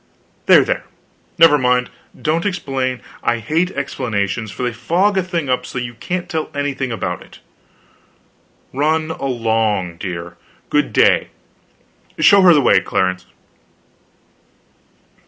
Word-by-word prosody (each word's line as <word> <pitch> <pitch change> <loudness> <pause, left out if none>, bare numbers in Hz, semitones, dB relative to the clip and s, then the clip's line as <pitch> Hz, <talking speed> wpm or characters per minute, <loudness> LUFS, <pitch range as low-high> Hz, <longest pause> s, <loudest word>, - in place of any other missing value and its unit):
There, - - +7
there, - - -2 0.5
never 160 -3 +6
mind, 125 -1 +1 0.3
don't 160 +2 0
explain, 135 -10 -2 0.2
I 120 - +1
hate 155 +10 0
explanations; 115 - -3
they 125 -2 -2
fog 175 - +1
a 190 - +2
thing 170 -4 -3
up 125 -1 0
so 125 - -8
that 125 - -2
you 120 - -8
can't 180 +9 -4
tell 160 -4 -3
anything 140 -2 -2
about 90 -5 -3
it. - - -15 1.4
Run 155 +3 0
along, 110 - -1
dear; 85 -1 -6 0.3
good - - +1
day; - - +3 0.9
show 200 -1 +6
her 185 -2 +7
the 145 - +4
way, 100 -6 +5
Clarence." 90 -1 -1
130 Hz, 125 wpm, -18 LUFS, 115-160 Hz, 1.4 s, There